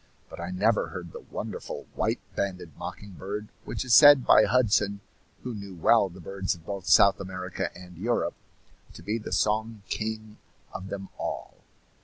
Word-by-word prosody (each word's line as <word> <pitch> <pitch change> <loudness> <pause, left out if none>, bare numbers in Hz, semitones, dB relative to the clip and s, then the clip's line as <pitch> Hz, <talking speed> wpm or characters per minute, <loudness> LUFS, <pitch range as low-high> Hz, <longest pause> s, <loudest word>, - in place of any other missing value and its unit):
But - - -9
I 85 +1 -4
never 105 +5 +2
heard 90 -3 -8
the - - -8
wonderful - - -6
white - - 0 0.2
banded 90 -5 -3
mocking 105 -1 -8
bird, 100 +4 -6 0.2
which - - -4
is 125 - +2
said 145 0 +9
by 110 - +7
Hudson, 105 -3 +2 0.4
who 125 - -4
knew 100 -3 -8
well 100 +4 +4
the 90 +1 -13
birds 95 +2 -2
of 80 -2 -17
both 100 -1 -5
South 100 - +6
America 90 -1 -4
and 90 0 -12
Europe, 115 +7 0 0.6
to - - -11
be 105 +5 -1
the 110 - -8
song 110 0 0
king 110 0 -4 0.3
of 95 - -6
them 100 -1 -6
all. - - -4
100 Hz, 170 wpm, -27 LUFS, 90-110 Hz, 0.6 s, said